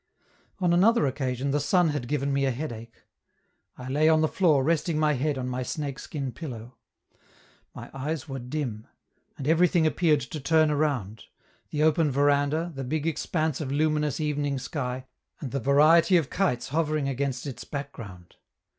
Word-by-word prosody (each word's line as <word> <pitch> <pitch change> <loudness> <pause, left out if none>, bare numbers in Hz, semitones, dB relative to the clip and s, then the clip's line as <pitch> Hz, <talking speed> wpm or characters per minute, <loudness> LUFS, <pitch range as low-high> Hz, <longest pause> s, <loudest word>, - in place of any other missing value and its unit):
On 180 -3 +1
another 200 +2 +4
occasion 130 0 -2
the 145 - +1
sun 165 +4 +2
had 145 -5 -3
given 140 0 -1
me 140 0 +1
a - - +2
headache; 115 -4 -6 0.7
I 125 - -8
lay 150 +4 +3
on 160 -1 +4
the 155 - +3
floor 155 -6 +2
resting 165 +1 0
my 155 -1 +2
head 140 +1 -1
on 125 -1 -3
my 125 0 -3
snake 140 +1 -4
skin 140 -4 -5
pillow. 120 -3 -9 1.0
My - - -9
eyes 150 +3 -4
were 135 -1 -5
dim; 125 -4 -4 0.5
and 135 - -5
everything 170 +1 +3
appeared 155 -2 +2
to 125 +5 -6
turn 155 +2 +3
around: 135 -9 -1 0.4
the 150 0 -1
open 155 0 +3
veranda, 145 +4 +1
the 135 -1 -5
big 150 +4 -2
expanse 160 -2 -1
of 135 -3 -4
luminous 150 0 0
evening 145 -2 -1
sky, 130 0 -4 0.3
and 135 -5 -6
a 140 - 0
variety 155 - +5
of 155 -6 -1
kites 135 -10 0
hovering 155 -1 0
against 135 -1 -2
its 135 -4 -6
background. 115 - -8
145 Hz, 165 wpm, -26 LUFS, 130-155 Hz, 1.0 s, variety